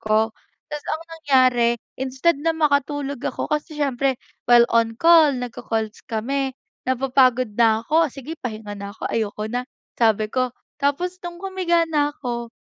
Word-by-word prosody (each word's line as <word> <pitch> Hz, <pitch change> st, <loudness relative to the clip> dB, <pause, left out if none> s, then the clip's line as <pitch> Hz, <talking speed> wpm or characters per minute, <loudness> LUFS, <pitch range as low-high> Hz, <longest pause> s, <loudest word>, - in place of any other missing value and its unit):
ko. 215 Hz, +1 st, +1 dB, 0.4 s
Ta's 295 Hz, -1 st, -5 dB
ang 315 Hz, -, -2 dB
nangyari 255 Hz, -7 st, +3 dB, 0.2 s
instead 265 Hz, +5 st, +1 dB
na 330 Hz, +1 st, +2 dB
makatulog 290 Hz, -2 st, 0 dB
ako -, -, -3 dB
kasi 300 Hz, 0 st, -3 dB
siyempre 275 Hz, -2 st, 0 dB, 0.3 s
while 240 Hz, -1 st, +7 dB
on 225 Hz, -1 st, +2 dB
call, 330 Hz, -3 st, +7 dB
nag-ko-calls 225 Hz, -3 st, -4 dB
kami 265 Hz, +4 st, -1 dB, 0.4 s
napapagod 255 Hz, -3 st, +2 dB
na 225 Hz, -2 st, +4 dB
ako, 320 Hz, +3 st, +3 dB
"Sige 295 Hz, +4 st, -7 dB
pahinga 215 Hz, -3 st, -5 dB
na 200 Hz, 0 st, -7 dB
ako, 220 Hz, -, -5 dB
ayoko 215 Hz, -1 st, -2 dB
na," 245 Hz, +2 st, -2 dB, 0.3 s
sabi 220 Hz, -2 st, +2 dB
ko. 255 Hz, -1 st, 0 dB, 0.3 s
Tapos 295 Hz, +6 st, 0 dB
nung 345 Hz, 0 st, -7 dB
humiga 365 Hz, -3 st, +1 dB
na 295 Hz, -2 st, +1 dB
ako, 235 Hz, -4 st, -5 dB
260 Hz, 145 wpm, -22 LUFS, 230-300 Hz, 0.4 s, while